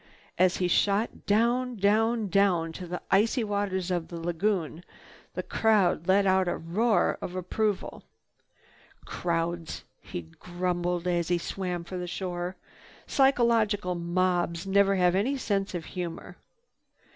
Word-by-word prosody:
As 185 0 +4
he 180 - +1
shot 200 +5 +1
down, 240 +4 +2
down, 220 +2 +2
down 185 -4 +2
to 180 +2 -8
the 180 +1 -5
icy 225 +5 +3
waters 200 -3 -1
of 175 -2 -1
the 170 - -7
lagoon, 175 -1 -1 0.5
the - - -2
crowd 195 -6 +2
let 195 +1 +4
out 190 -1 +3
a - - -1
roar 210 +8 +1
of 180 - -5
approval. 200 +3 -2 1.0
"Crowds," 170 -1 -3 0.2
he 85 - -6
grumbled 175 - -3
as 175 -2 0
he 175 - +2
swam 180 0 -4
for 185 +2 -7
the 180 - -4
shore, 175 0 -4 0.5
"psychological 230 -8 +2
mobs 175 0 0
never 195 0 +3
have 180 -2 +3
any 235 +9 +1
sense 200 -6 -1
of 165 -2 -4
humor." 175 -3 -6
185 Hz, 135 wpm, -28 LUFS, 175-205 Hz, 1.0 s, As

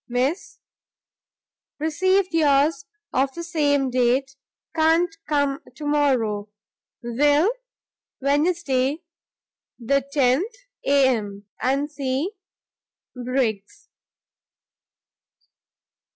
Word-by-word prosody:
Miss, 260 +9 -2 1.2
Received 370 +5 +1
yours 290 -1 +3 0.3
of 265 +1 +2
the 340 - -5
same 290 -5 +1
date; 255 +2 +1 0.4
can't 325 +1 +2
come 285 -2 +1 0.2
tomorrow. 260 -9 0 0.5
Will, 290 - +3 0.7
Wednesday 290 0 +1 0.7
the 275 +4 +1
10th. 285 - 0 0.2
Am, 230 -8 +1 0.4
&c., 280 +3 -2 0.8
Jno. 250 - -7
Briggs. 250 - -2
280 Hz, 65 wpm, -23 LUFS, 255-320 Hz, 1.2 s, yours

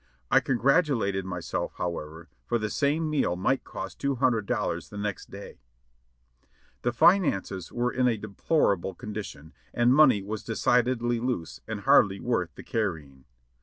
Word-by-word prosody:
I - - +7
congratulated 125 - +1
myself, 90 -2 -4
however, 80 -1 -5 0.2
for 120 - 0
the 110 -2 -3
same 150 +3 +1
meal 150 -12 0
might 100 +9 0
cost - - -7
two 140 -1 0
hundred 120 -5 +1
dollars - - -2
the 105 - -9
next 105 -1 -4
day. 100 +1 -10
Quien - - -43
sabef - - -36
The 120 - 0
finances 115 - +2
were 120 +1 -1
in 130 0 +1
a 115 -3 +1
deplorable 100 - 0
condition, 100 -7 -8 0.2
and 120 +1 +4
money 130 -9 +5
was 105 +1 -5
decidedly 120 +1 +1
"loose" 120 -9 -3
and - - -4
hardly 100 -1 +4
worth 105 -9 -1
the - - -10
carrying. 75 - -3
105 Hz, 155 wpm, -27 LUFS, 90-125 Hz, 0.2 s, I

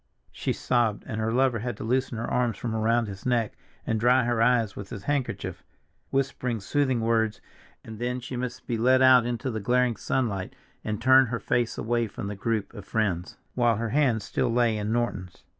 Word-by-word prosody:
she - - -2
sobbed, 115 -4 0
and 110 0 -4
her 110 +1 0
lover 125 -1 +2
had 120 -1 -4
to - - -6
loosen 125 +1 0
her 115 - -3
arms 120 -2 0
from 115 -2 -3
around 115 +2 +2
his 100 -2 -8
neck 120 -3 0 0.3
and 110 - 0
dry 125 +3 +4
her 120 -1 0
eyes 115 -3 +3
with 100 -1 -8
his 100 -4 -7
handkerchief, 145 -1 -2 0.5
whispering 130 -3 -1
soothing 130 +3 0
words, 110 -1 +1 0.5
and 110 -1 -9
then 125 +1 -2
she 125 +1 -7
must 125 0 -5
be 115 -3 -2
led 130 +2 +4
out 130 -2 +6
into 120 +2 -2
the 110 - -3
glaring 125 +2 +2
sunlight 105 -5 -2 0.3
and 110 +1 -3
turn 130 +1 +6
her 120 0 -3
face 120 -1 0
away 120 0 0
from 100 - -7
the 100 +1 -4
group 110 +1 -2
of 105 -4 -9
friends, 95 -5 -2 0.2
while 120 -2 +3
her 115 +2 -2
hand 125 -5 +2
still 120 +4 -1
lay 120 -1 +2
in 105 0 -2
Norton's. 105 -6 -2
115 Hz, 200 wpm, -26 LUFS, 110-125 Hz, 0.5 s, out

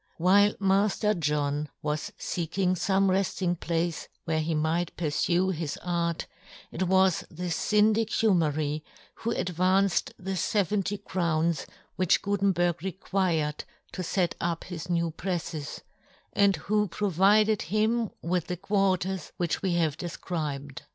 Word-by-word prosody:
While 200 +4 +4
Mailer 200 +2 +2
John 150 -1 0
was 150 +6 -2
feeking 180 +2 -1
fome 195 +2 +2
reft 190 0 0
ing 175 -2 +1
place 165 0 -2 0.2
where 160 -1 0
he 160 +1 -1
might 160 +3 0
purfue 175 +3 +1
his 160 -4 -3
art, 170 -2 -1 0.5
it 185 - -1
was 190 -1 +3
the 175 +1 -5
Syndic 215 +4 +3
Humery 155 -9 +1 0.4
who 230 - -3
advanced 185 -1 +1
the 190 +1 -4
feventy 200 +2 0
crowns 170 -5 0 0.3
which 185 -1 +3
Gutenberg 190 -4 +1
required 180 -5 -1 0.3
to 185 - -5
fet 180 0 0
up 170 -1 -1
his 180 -1 -7
new 170 -1 +1
prefles, 165 -3 -4 0.5
and 200 -1 +4
who 210 0 0
provided 205 +3 +3
him 215 +4 +1
with 175 0 0
the 180 - -3
quarters 190 -2 0
which 175 -2 -1
we 185 -3 0
have 160 -3 +1
def 175 -1 -6
cribed. 145 -5 -4
180 Hz, 130 wpm, -28 LUFS, 165-195 Hz, 0.5 s, While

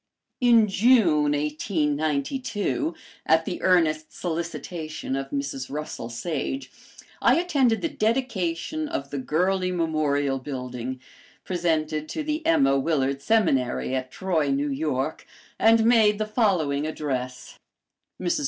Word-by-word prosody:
In 235 -4 +5
June, 190 - +4
1892, 155 - -1 0.3
at 160 0 +4
the 180 - -4
earnest 155 -4 +2
solicitation 165 -3 -4
of 135 0 -4
Mrs. 140 -2 -4
Russell 145 -5 -5
Sage, 170 - -4 0.5
I - - +5
attended 280 -10 +2
the 330 - +1
dedication 225 - -1
of 325 +2 -4
the 140 - -3
Gurley 185 +6 0
Memorial 150 -5 0
Building, 125 -1 -5 0.4
presented 155 -4 -1
to 315 - -3
the 305 +1 -2
Emma 135 - +4
Willard 140 -2 0
Seminary, 140 - +1
at 130 -1 -2
Troy, 165 -3 -1
New 140 +1 0
York, 140 0 -2 0.3
and 225 0 +5
made 220 -3 +5
the 215 - -1
following 175 - +1
address: 130 -5 -4 0.6
"MRS. 180 +9 0
160 Hz, 115 wpm, -25 LUFS, 140-210 Hz, 0.6 s, In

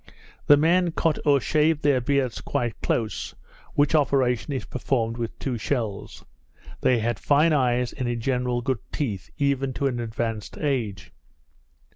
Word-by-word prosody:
The 145 - +8
men 170 +3 +3
cut 160 -2 +1
or 140 -1 +5
shave 150 +3 +1
their 140 -3 +3
beards 130 -2 0
quite 120 -2 -3
close, 110 -3 -2 0.4
which 145 +1 +3
operation 135 -3 +2
is 135 - -3
performed 115 -3 -1
with 115 -1 -4
two 125 -4 -3
shells. 110 -3 -3 0.6
They 125 - +3
have 115 -2 -1
fine 150 +3 +3
eyes, 125 -3 +1
and 125 -3 -3
in 120 -1 -2
general 125 0 0
good 130 -2 -1
teeth, 105 -11 -3
even 140 -2 0
to 140 - -2
an 125 -3 0
advanced 115 -2 -4
age. 120 -10 -2
130 Hz, 150 wpm, -25 LUFS, 120-145 Hz, 0.6 s, The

